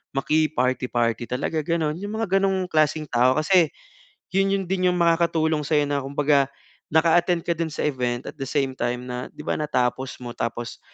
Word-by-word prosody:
makiparty-party 130 Hz, -6 st, +1 dB
talaga 145 Hz, +5 st, -1 dB
ganun. 160 Hz, -2 st, 0 dB
'Yung 205 Hz, +2 st, -5 dB
mga 210 Hz, -4 st, 0 dB
gano'ng 190 Hz, -1 st, 0 dB
klaseng 155 Hz, 0 st, +2 dB
tao 125 Hz, +2 st, +3 dB
kasi, 170 Hz, 0 st, +3 dB, 0.6 s
'yun 195 Hz, +1 st, +2 dB
'yun 195 Hz, -, -1 dB
din 185 Hz, -1 st, +1 dB
'yung -, -, -1 dB
makakatulong 165 Hz, -2 st, +2 dB
sa'yo 150 Hz, -2 st, +3 dB
na, 145 Hz, -1 st, +1 dB
kumbaga, 140 Hz, 0 st, +2 dB, 0.4 s
naka-attend 170 Hz, +2 st, +3 dB
ka -, -, 0 dB
dun 165 Hz, 0 st, -1 dB
sa -, -, -3 dB
event 125 Hz, -4 st, -1 dB
at -, -, -11 dB
the 135 Hz, -, -3 dB
same 135 Hz, 0 st, 0 dB
time 120 Hz, +1 st, -2 dB
na 125 Hz, 0 st, -4 dB
'di 150 Hz, -, -9 dB
ba, -, -, -1 dB
natapos 130 Hz, -3 st, -1 dB
mo 120 Hz, -, -5 dB
tapos 115 Hz, 0 st, -4 dB
150 Hz, 175 wpm, -24 LUFS, 130-170 Hz, 0.6 s, tao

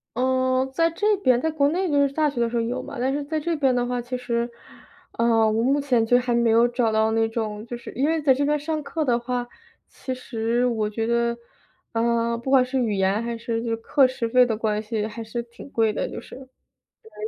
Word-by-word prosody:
嗯， 260 Hz, +1 st, +1 dB
在 330 Hz, +3 st, +2 dB
这 415 Hz, +6 st, +1 dB
边 255 Hz, -10 st, +3 dB
在 320 Hz, -, 0 dB
国 285 Hz, -2 st, +2 dB
内 365 Hz, +3 st, -1 dB
就 285 Hz, -1 st, +3 dB
是 275 Hz, -, -3 dB
大 305 Hz, 0 st, +2 dB
学 260 Hz, -4 st, -3 dB
的 235 Hz, -, +1 dB
时 240 Hz, -, -2 dB
候 -, -, +2 dB
有 245 Hz, +3 st, -2 dB
嘛， -, -, -8 dB
但 260 Hz, +2 st, 0 dB
是 290 Hz, +1 st, -2 dB
在 310 Hz, +2 st, -2 dB
这 335 Hz, +2 st, -1 dB
边 275 Hz, -4 st, +2 dB
的 245 Hz, 0 st, +1 dB
话， 245 Hz, 0 st, -2 dB
其 250 Hz, +1 st, -4 dB
实， 240 Hz, -1 st, -2 dB, 0.7 s
呃， 230 Hz, -1 st, +3 dB
我 220 Hz, +1 st, +1 dB
目 275 Hz, +4 st, +2 dB
前 250 Hz, -5 st, +2 dB
就 245 Hz, +2 st, +4 dB
还 245 Hz, -1 st, -1 dB
没 235 Hz, -1 st, +2 dB
有 230 Hz, +2 st, +5 dB
找 240 Hz, -2 st, 0 dB
到 220 Hz, 0 st, +2 dB
那 225 Hz, 0 st, +2 dB
种。 215 Hz, -2 st, -4 dB
就 240 Hz, 0 st, -6 dB
是， 235 Hz, -, -10 dB
因 270 Hz, -, 0 dB
为 325 Hz, -1 st, 0 dB
在 280 Hz, -3 st, +5 dB
这 275 Hz, +3 st, -1 dB
边 295 Hz, +1 st, +1 dB
上 305 Hz, +1 st, -3 dB
课 315 Hz, +2 st, -2 dB
的 245 Hz, -3 st, +2 dB
话， 245 Hz, 0 st, -3 dB, 0.4 s
其 260 Hz, -, -6 dB
实 235 Hz, -1 st, -1 dB
我 220 Hz, -4 st, 0 dB
觉 225 Hz, +1 st, -3 dB
得， 235 Hz, 0 st, +1 dB, 0.6 s
呃， 235 Hz, 0 st, +1 dB
不 235 Hz, +3 st, -6 dB
管 265 Hz, -2 st, +5 dB
是 260 Hz, +1 st, -3 dB
语 235 Hz, -5 st, 0 dB
言 195 Hz, +3 st, +1 dB
还 235 Hz, 0 st, -3 dB
是 230 Hz, 0 st, -3 dB
就 230 Hz, -1 st, -1 dB
课 270 Hz, +5 st, +3 dB
时 255 Hz, -2 st, -1 dB
费 250 Hz, +2 st, +5 dB
的 225 Hz, -3 st, -2 dB
关 215 Hz, -1 st, -1 dB
系， 215 Hz, -1 st, -2 dB
还 225 Hz, +1 st, -7 dB
是 230 Hz, +2 st, -4 dB
挺 235 Hz, +3 st, -13 dB
贵 225 Hz, -4 st, +1 dB
的， -, -, -2 dB
就 -, -, -6 dB
是， -, -, -12 dB
对 265 Hz, -, -11 dB, 0.6 s
啊， 215 Hz, -, -25 dB
240 Hz, 265 characters per minute, -24 LUFS, 230-270 Hz, 0.7 s, 有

